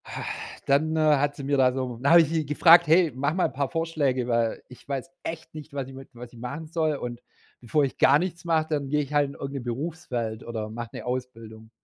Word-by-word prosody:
Ha, - - -6 0.4
dann, 155 +3 +2
äh, - - +1 0.2
hat 145 +1 0
sie 140 - -8
mir 140 +1 +1
da 130 -1 +5
so 130 -2 -3
dann 140 - +3
habe 170 0 +9
ich 160 - 0
sie 160 -1 0
gefragt: 165 +4 +6
„Hey, 165 0 +5
mach 140 +3 0
mal 185 - +2
paar 135 +1 -2
Vorschläge, 150 -7 -1
weil 115 -2 0
ich 125 - -16
weiß 140 +4 -4
echt 165 0 -6
nicht, 155 -1 -10
was 135 -2 -3
ich 135 - -11
mit 135 0 -11
was 120 0 -11
ich 120 - -13
machen 140 +6 -6
soll 155 -1 0
und 120 -3 -6 0.4
bevor 135 +5 +1
ich 135 - -2
gar - - +6
nichts 175 0 -4
mache, 160 -2 +1
dann 145 -3 -1
gehe 150 +1 +2
ich 145 +1 -9
halt 145 -1 +3
in - - -9
irgend 140 0 -6
'ne 140 - -3
Berufswelt 120 -3 -4
oder 110 -2 -5
mache 115 +1 -6
'ne - - -7
Ausbildung.“ 115 -3 -6
140 Hz, 245 wpm, -26 LUFS, 125-155 Hz, 0.4 s, habe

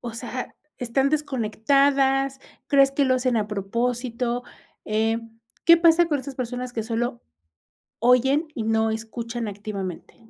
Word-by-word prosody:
o 235 -2 -6
sea, 245 +2 -6 0.2
¿están 260 +3 +1
desconectadas? 270 0 +1 0.3
¿Crees 275 -1 +5
que 280 0 +1
lo 260 -1 +3
hacen 250 -2 +1
a 210 -1 0
propósito?, 235 +4 -2 0.4
eh, 220 +1 +1 0.5
¿qué 335 0 +8
pasa 335 0 +5
con 295 -3 0
esas 270 0 -7
personas 250 0 -4
que 225 - -2
solo, 230 - -3 0.8
oyen 265 +6 +3
y 225 - -2
no 220 0 +1
escuchan 230 0 -4
activamente? 200 -3 -6
245 Hz, 135 wpm, -24 LUFS, 225-270 Hz, 0.8 s, qué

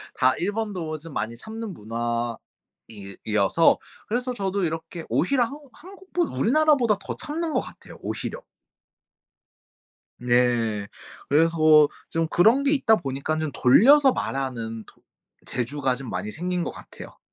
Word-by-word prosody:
다 130 0 +3
일본도 190 -5 -3
좀 165 -1 -11
많이 115 0 -3
참는 220 - -7
문화 115 0 -3 0.5
이 100 -3 -11
이어서 110 - +3 0.3
그래서 250 +3 -2
저도 195 -2 -2
이렇게 165 0 -4
오히려 245 - +2
한국 280 +2 -7
한국 380 +2 -15
보 350 0 +2
우리나라보다 270 -6 +2
더 - - -6
참는 315 +1 -4
것 - - +2
같아요 - - -12
오히려. - - -5 1.8
네. 120 -4 +1 0.4
그래서 165 +3 +3 0.5
좀 165 0 0
그런 225 - +4
게 280 - +2
있다 225 -6 +4
보니깐 140 +1 -3
좀 155 -2 -2
돌려서 265 - +6
말하는 115 - -4
토 - - -21 0.4
재주가 130 +1 -1
좀 130 -3 -8
많이 105 - -4
생긴 180 +3 -2
것 - - -4
같아요. - - -12
165 Hz, 275 characters per minute, -24 LUFS, -, 1.8 s, 돌려서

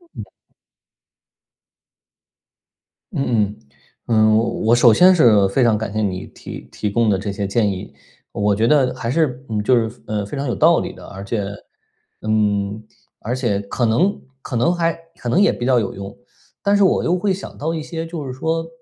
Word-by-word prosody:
嗯。 - - -6 2.9
嗯 125 - +1
嗯。 - - -24 0.5
嗯， 110 -2 +4 0.3
我 115 +2 +5
首 120 -2 +6
先 185 - +6
是 110 - +5
非 130 +6 +2
常 115 -3 +3
感 110 -1 -4
谢 110 - -1
你 95 -3 -2
提 - - -10
提 105 - -3
供 115 +1 +1
的 95 - +2
这 100 +1 -4
些 100 0 -3
建 105 0 +1
议， 95 -1 -7 0.4
我 105 0 +1
觉 115 +3 +1
得 130 -3 +3
还 120 -2 -5
是， 135 -3 0
嗯， 105 -1 -1
就 125 +4 +4
是， 115 - -17
呃， 105 -1 -2
非 120 +8 -6
常 140 - -2
有 120 - -1
道 - - +4
理 - - -5
的， - - -13
而 95 +1 -9
且， 100 0 -2 0.8
嗯， 105 -1 0 0.4
而 115 - -4
且 115 -6 0
可 115 +4 -2
能 175 - +1 0.2
可 125 - -6
能 170 +10 +2
还 165 -1 +1 0.2
可 120 - -5
能 170 - +2
也 205 - +4
比 120 - -4
较 125 -1 +4
有 105 - -3
用。 100 +1 -8 0.4
但 200 0 +2
是 205 - +4
我 190 - +3
又 180 +2 +1
会 195 +1 0
想 190 - -8
到 160 +3 -2
一 160 - -3
些 165 +1 -5
就 165 -3 -6
是 130 - -5
说， 165 +5 -2
120 Hz, 205 characters per minute, -20 LUFS, 105-150 Hz, 2.9 s, 首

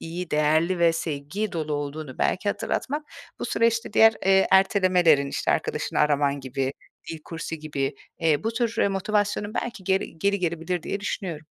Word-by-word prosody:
iyi, 170 +1 -6
değerli 155 +4 +2
ve 170 -1 +4
sevgi 165 +6 -3
dolu 155 -2 -3
olduğunu 145 -1 -5
belki 205 +2 0
hatırlatmak, 290 +8 -2 0.4
bu - - -4
süreçte 230 -1 +1
diğer, 225 +1 +6
eee, 195 0 +5
ertelemelerin, 185 -6 +4
işte, - - -1
arkadaşını - - -1
araman 145 -1 +2
gibi, 135 0 -2 0.4
dil 165 - -5
kursu 165 -1 -5
gibi, 145 -3 -3 0.2
eee, 160 +2 +1
bu 225 - +1
tür, 230 -1 -1
eee, - - +3
motivasyonun 205 +2 -1
belki 235 -6 -4
geri 190 -3 -1
geri 200 +3 +1
gelebilir 170 0 -2
diye 200 - -3
düşünüyorum. 175 -7 -4
170 Hz, 160 wpm, -25 LUFS, 150-200 Hz, 0.4 s, diğer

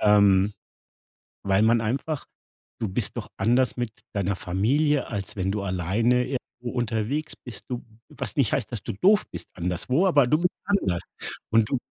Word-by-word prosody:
ähm, 100 -1 +5 0.9
weil 100 0 +3
man 115 +1 +4
einfach 135 +7 -2 0.5
du 110 - -1
bist 100 +2 0
doch 110 - -5
anders 120 +6 +2
mit 120 -2 -2 0.2
deiner 100 -1 0
Familie, 125 - +1
als 100 -3 -4
wenn 95 0 0
du 105 - -2
alleine 100 +7 +1
irgendwo 125 -2 -5
unterwegs 120 +6 -1
bist. 120 - -9
Du 125 -1 -4 0.2
was - - -5
nicht - - +2
heißt, - - 0
dass - - -4
du - - -4
doof 200 - +4
bist - - -6
anderswo, 95 - +1
aber 145 -8 +5
du 150 +5 +3
bist 180 +1 +1
anders. 95 - +1 0.5
Und 110 -1 +3
du 135 - +1
115 Hz, 165 wpm, -26 LUFS, 100-130 Hz, 0.9 s, ähm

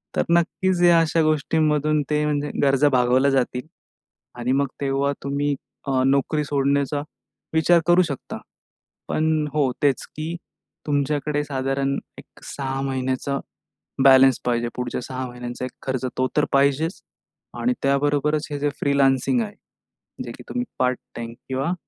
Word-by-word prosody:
तर - - +2
नक्कीच 180 +1 0
या 170 -1 +7
अशा 165 0 +2
गोष्टींमधून, 155 -1 +2
ते 150 0 +1
म्हणजे 145 -1 -1
गरजा 140 +1 +4
भागवल्या 130 +1 +3
जातील. 125 +1 0 0.7
आणि 125 +1 -1
मग, 140 +1 +2
तेव्हा 140 +1 0
तुम्ही 145 +1 0 0.3
अ, 130 -1 +1
नोकरी 140 +3 +1
सोडण्याचा 140 0 0 0.5
विचार 165 +2 +4
करू 175 +1 +6
शकता. 145 -6 -5 0.7
पण 155 -1 +1
हो, 145 -4 +2
तेच, 140 -2 +2
की 160 +2 -4 0.5
तुमच्याकडे 145 +1 0
साधारण 135 0 -1 0.2
एक - - -15
6 135 -1 -4
महिन्याचा 130 +1 -1 0.7
बॅलन्स 135 -1 +7
पाहिजे. 120 -1 0
पुढच्या 125 0 -3
6 130 0 -5
महिन्यांचा 125 0 -6
एक 130 - -4
खर्च, 130 -1 -2
तो 130 - +2
तर 150 - +4
पाहिजेच 140 +5 +2 0.6
आणि 250 - +2
त्याबरोबरच 145 +2 +1
हे 145 - -3
जे 145 - +1
फ्रीलान्सिंग 140 - +2
आहे. 210 -1 -6 0.7
जे - - -7
की - - -12
तुम्ही 245 0 -2
पार्ट-टाईम 120 -2 -2 0.2
किंवा 135 +6 -1
140 Hz, 135 wpm, -23 LUFS, 130-150 Hz, 0.7 s, या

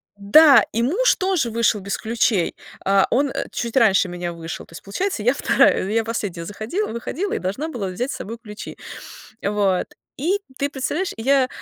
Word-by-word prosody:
Да, 235 +5 +7
и 230 - 0
муж 380 - +3
тоже 370 - 0
вышел 230 -1 +2
без 195 0 -3
ключей, 220 -5 0 0.3
а, 195 0 +4
он 275 +2 +2 0.2
чуть 235 +1 -3
раньше 200 -6 +4
меня 175 -1 -4
вышел, 165 -1 -7
то - - -19
есть 155 - -9
получается, 360 - -2
я 245 +4 +3
2, 275 - +3
я 225 +2 +1
последняя 205 -7 -4
заходила, 220 - -3
выходила 280 - -3
и - - -1
должна 200 +12 -3
была 235 -10 -4
взять 245 +9 -3
с - - -4
собой 225 +3 -7
ключи. 210 -3 -9 0.7
Вот, 200 -2 +1 0.3
и 355 +9 0 0.2
ты 280 - -1
представляешь, 300 +7 -2
я, 265 +3 +3
230 Hz, 175 wpm, -22 LUFS, 200-280 Hz, 0.7 s, Да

